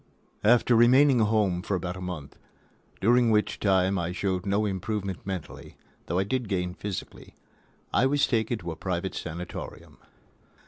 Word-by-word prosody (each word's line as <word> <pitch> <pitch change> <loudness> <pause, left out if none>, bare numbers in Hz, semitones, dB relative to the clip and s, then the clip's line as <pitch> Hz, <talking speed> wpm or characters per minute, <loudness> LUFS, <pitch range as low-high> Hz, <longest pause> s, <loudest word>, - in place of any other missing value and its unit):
V 105 - +3
After 120 0 +5
remaining 125 +2 +5
at 110 - +3
home 105 -5 +1
for 100 0 -2
about 90 0 -3
a 95 - -8
month, 90 -6 -6 0.7
during 120 +3 +4
which 105 -1 +1
time 95 -1 +2
I 85 0 -2
showed 95 +1 -2
no 100 +2 +1
improvement 100 -1 -3
mentally, 95 -5 -7 0.3
though 85 - -1
I 95 - +3
did 120 +2 -2
gain 90 -2 -1
physically, 100 0 -7 0.6
I 130 - +4
was 145 +1 +2
taken 115 0 0
to 85 -5 -6
a - - -6
private 95 +2 -3
sanatorium. 85 +1 -7
100 Hz, 165 wpm, -27 LUFS, 90-110 Hz, 0.7 s, After